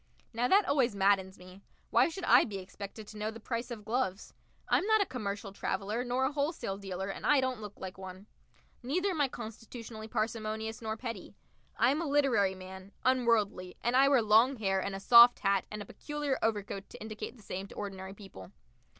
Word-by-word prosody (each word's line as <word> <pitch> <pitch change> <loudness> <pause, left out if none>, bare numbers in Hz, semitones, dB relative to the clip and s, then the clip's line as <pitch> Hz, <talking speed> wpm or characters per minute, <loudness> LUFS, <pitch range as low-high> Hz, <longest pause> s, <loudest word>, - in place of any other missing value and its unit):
Now 240 +2 +1
that 395 +6 +4
always 255 -6 +2
maddens 195 -1 +2
me. 185 +1 -14 0.3
Why - - +4
should 355 +3 -7
I - - +6
be 205 -4 -5
expected 200 +3 -8
to 215 - -10
know 215 +1 -1
the 225 +1 -8
price 235 +2 -4
of 220 -4 -7
gloves? 220 -4 -2 0.3
I'm - - +3
not 440 0 +5
a 400 - +3
commercial 205 - -5
traveller 210 +4 -2
nor 250 +1 0
a 265 - 0
wholesale 285 - -2
dealer, 190 -1 -5
and 195 - -6
I 290 - +4
don't 260 -3 -1
look 205 -1 -9
like 190 0 -7
one. 190 +1 -9 0.6
Neither 345 +10 0
am 320 -5 -1
I 285 - +4
constitutionally 225 -1 -8
parsimonious 220 0 -3
nor 220 -1 -3
petty. 230 -1 -7 0.4
I 240 - +4
am 300 +4 0
a 335 - -2
literary 250 -10 +2
man, 190 +1 -11
unworldly, 225 -8 +1
and 240 +2 +1
I 270 +1 +6
wear 265 -5 +4
long 225 +6 +5
hair 195 -4 0
and 200 0 -3
a - - -5
soft 235 +4 +8
hat 195 -1 +2
and 210 -1 -6
a - - -14
peculiar 295 -2 -3
overcoat 200 -3 -2
to - - -11
indicate 220 +3 -7
the 215 - -17
same 190 +1 -5
to - - -13
ordinary 195 -1 -6
people. 195 - -12
220 Hz, 200 wpm, -31 LUFS, 195-255 Hz, 0.6 s, soft